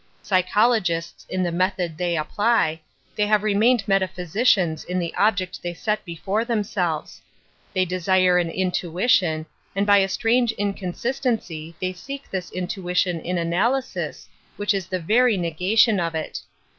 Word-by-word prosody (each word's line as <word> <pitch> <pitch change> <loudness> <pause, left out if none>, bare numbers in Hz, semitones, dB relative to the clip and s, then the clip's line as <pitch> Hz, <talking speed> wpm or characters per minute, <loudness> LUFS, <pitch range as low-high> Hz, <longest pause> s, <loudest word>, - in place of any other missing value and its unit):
Psy 185 -2 +3
chologists 185 -4 0
in 185 0 -1
the 175 - 0
method 180 -1 -1
they 175 0 -1
apply, 160 -1 +1 0.3
they 210 -1 +1
have 210 -1 +3
remained 215 +2 +3
metaphysicians 190 -2 +1
in 180 - -3
the 170 -2 -2
object 195 -3 0
they 175 0 -4
set 210 +5 -1
before 190 +6 -2
themselves. 195 -9 -2 0.5
They 185 0 +3
desire 185 0 +3
an 170 -1 0
intuition, 180 -2 +1 0.3
and 200 +1 +1
by 205 0 +6
a 195 0 +1
strange 235 +2 +2
inconsistency 200 - -3
) - - -33
they 185 0 -2
seek 275 +10 -9
this 185 -2 -3
intuition 180 -1 -1
in 180 +3 -3
analysis, 215 +11 -1 0.3
which/ 205 +1 +1
is 190 -3 -3
the 185 - -2
very 225 +6 +3
negation 185 +6 +2
of 165 -1 -2
it. 160 - -4
185 Hz, 145 wpm, -23 LUFS, 175-210 Hz, 0.5 s, by